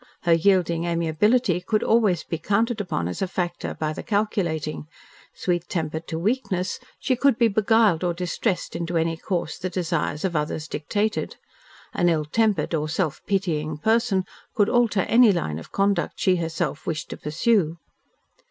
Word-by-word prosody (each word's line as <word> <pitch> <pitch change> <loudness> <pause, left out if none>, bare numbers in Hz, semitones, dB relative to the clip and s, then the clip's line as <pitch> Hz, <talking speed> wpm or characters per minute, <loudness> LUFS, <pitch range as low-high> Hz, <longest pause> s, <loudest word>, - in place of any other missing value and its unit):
Her 170 - +4
yielding 170 -1 +2
amiability 175 +4 +2
could 215 +3 0
always 210 -7 +3
be 165 - -4
counted 215 +5 +1
upon 85 - -2
as 90 - -5
a 190 - +1
factor 175 -1 -3
by 155 0 -2
the - - -6
calculating; 175 -9 -1 0.5
sweet 175 -2 -1
tempered 160 -2 -3
to 160 - -3
weakness, 195 -1 -1 0.2
she 255 - 0
could 255 -1 +3
be 235 - +4
beguiled 215 -4 +3
or 175 - +1
distressed 180 +3 -2
into 170 0 -2
any 165 0 +1
course 170 -1 -3
the 185 0 -3
desires 170 -3 -1
of 175 -3 -2
others 150 +1 -2
dictated. 205 +9 -2 0.6
An 175 - +2
ill 155 -2 +1
tempered 200 -1 +1
or 155 -1 0
self 160 -2 -1
pitying 155 -6 -1
person 220 +1 +1 0.3
could 205 -1 +3
alter 235 -5 +3
any 230 +2 +5
line 80 - -2
of 80 - -12
conduct 195 -3 0
she 185 -1 +3
herself 165 -3 -3
wished 155 -1 -3
to - - -5
pursue. 170 +1 +1
175 Hz, 160 wpm, -24 LUFS, 160-210 Hz, 0.6 s, any